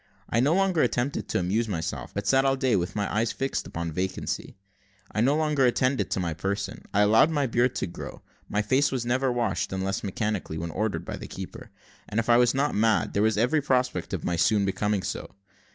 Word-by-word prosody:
I 115 - +1
no 145 +7 +3
longer 190 -4 +2
attempted 125 +3 0
to - - -1
amuse 105 +6 0
myself, 85 -6 -4
but 100 0 -4
sat 135 +7 +4
all 135 0 +3
day 130 -4 +1
with 90 -1 -1
my 105 -1 -1
eyes 110 +1 +1
fixed 135 0 -2
upon 85 0 -4
vacancy. 95 +4 -3 0.5
I 105 - 0
no 135 +5 +3
longer 150 -3 +1
attended 130 +2 +2
to - - -1
my 85 -3 -1
person; 100 +5 -3
I 105 - +3
allowed 110 +8 +5
my 145 -3 +1
beard 120 +1 +1
to - - -1
grow 85 - -8 0.3
my 105 +1 0
face 130 +6 +2
was 125 -3 -2
never 130 +2 +1
washed, 120 -1 -1
unless 95 +1 -2
mechanically, 100 -4 -2
when 85 +1 -4
ordered 105 +4 -2
by - - -5
the - - -8
keeper; - - -8 0.4
and, 105 - 0
if 115 - -2
I 120 - +7
was 120 +1 +4
not 145 +2 +1
mad, 110 +1 +2
there 100 - +1
was 110 -1 +2
every 125 +8 +2
prospect 125 - 0
of - - -3
my 85 - -1
soon 100 +3 +3
becoming 100 0 0
so. - - -5
115 Hz, 215 wpm, -26 LUFS, 100-130 Hz, 0.5 s, I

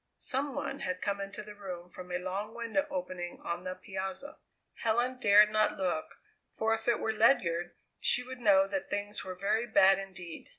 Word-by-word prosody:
Some 270 0 -2
one 275 - -3
had 185 0 -2
come 200 0 -2
into 195 +2 -6
the 210 0 -10
room 185 -4 -7
from 180 0 -10
a 180 - 0
long 195 +5 -4
window 235 +5 -1
opening 180 -1 -4
on 170 +1 -3
the 185 0 -3
piazza. 190 +9 -6 0.4
Helen 240 +3 +1
dared 210 -1 +7
not 215 0 +2
look, 180 -4 -2 0.4
for 225 0 +2
if 225 +1 -3
it 240 - +4
were 220 - 0
Ledyard 175 -7 +2 0.2
she 250 - +4
would 255 0 -8
know 200 -4 +5
that 285 +7 -3
things 205 +1 -3
were 185 -1 -6
very 210 +5 0
bad 195 -3 +6
indeed. 180 -4 -8
200 Hz, 185 wpm, -31 LUFS, 185-225 Hz, 0.4 s, dared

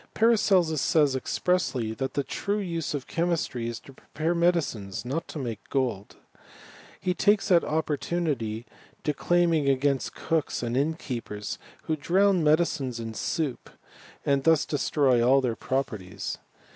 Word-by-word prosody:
Paracelsus 190 - +3
says, 145 -4 +3
expressly, 130 -6 0
that 130 +2 -4
the 140 - +1
true 200 +9 -2
use 170 -7 -2
of 135 - -4
chemistry 165 -8 -1
is 115 -1 -4
to 135 - -15
prepare 160 +5 -3
medicines, 150 - 0
and 125 +2 -4
not 165 - -2
to - - -7
make 115 -6 -5
gold. 125 -7 -1 0.8
He 180 -1 0
takes 205 +2 +2
that 175 -3 +5
opportunity 150 -7 -1 0.3
of - - -34
declaiming 165 -1 +2
against 135 -1 +1
cooks 160 -6 -1
and 120 0 -2
innkeepers, 125 -8 -3 0.2
who 160 - -1
drown 185 +4 +3
medicines 150 -6 +1
in 115 -1 -5
soup, 140 +4 -2 0.6
and 140 -1 +2
thus 160 0 +4
destroy 140 -4 +2
all 130 +3 +5
their 125 -4 -1
proper 130 -4 -2
ties. 90 -1 -6
145 Hz, 145 wpm, -27 LUFS, 125-170 Hz, 0.8 s, that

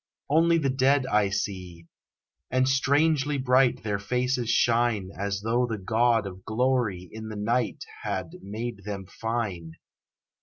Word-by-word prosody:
Only 165 +2 +4
the 140 -5 +1
dead 135 +1 +3
I 105 -5 +2
see, 90 -4 -4 0.6
and 130 0 +2
strangely 145 +2 +2
bright 130 -1 +3
Their 105 -2 -1
faces 125 +2 -1
shine 115 -5 +2
As 100 0 -2
though 120 +3 +1
the 115 -2 -3
God 115 +2 +2
of 95 -1 -8
Glory 110 -6 0
in 110 0 -7
the 110 - -6
night 115 +3 -1 0.2
Had - - -3
made 110 +2 -5
them 100 -1 -5
fine. 100 -6 -4
115 Hz, 140 wpm, -26 LUFS, 100-130 Hz, 0.6 s, Only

